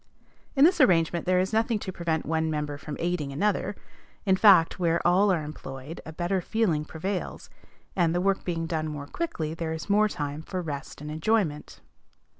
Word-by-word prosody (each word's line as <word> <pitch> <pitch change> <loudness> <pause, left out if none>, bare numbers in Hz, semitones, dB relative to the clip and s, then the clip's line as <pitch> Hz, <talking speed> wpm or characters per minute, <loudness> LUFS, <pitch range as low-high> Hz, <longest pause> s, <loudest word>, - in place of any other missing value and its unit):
In 275 +1 +7
this 360 +3 +4
arrangement 170 -1 +3
there 185 0 +3
is 190 +3 -1
nothing 225 +1 +2
to 200 -2 -5
prevent 165 -3 -1
one 160 0 0
member 150 -2 -3
from 150 -1 -7
aiding 170 -5 -1
another; 200 +6 0 0.5
in 190 -2 +4
fact, 190 -5 +5
where 170 -1 +2
all 190 +3 +4
are 165 -4 0
employed, 145 0 -8
a - - -6
better 175 +3 -1
feeling 175 -7 0
prevails, 185 +5 -5 0.4
and, 170 -2 +2
the - - +2
work 195 +1 +1
being 165 -2 -2
done 160 -1 -2
more 150 -2 -5
quickly, 160 - -3
there 165 -1 -3
is 160 +5 -4
more 210 +1 +5
time 145 -5 -4
for 185 +3 -5
rest 145 -2 -6
and 150 0 -6
enjoyment. 160 -2 -1
165 Hz, 185 wpm, -27 LUFS, 155-190 Hz, 0.5 s, In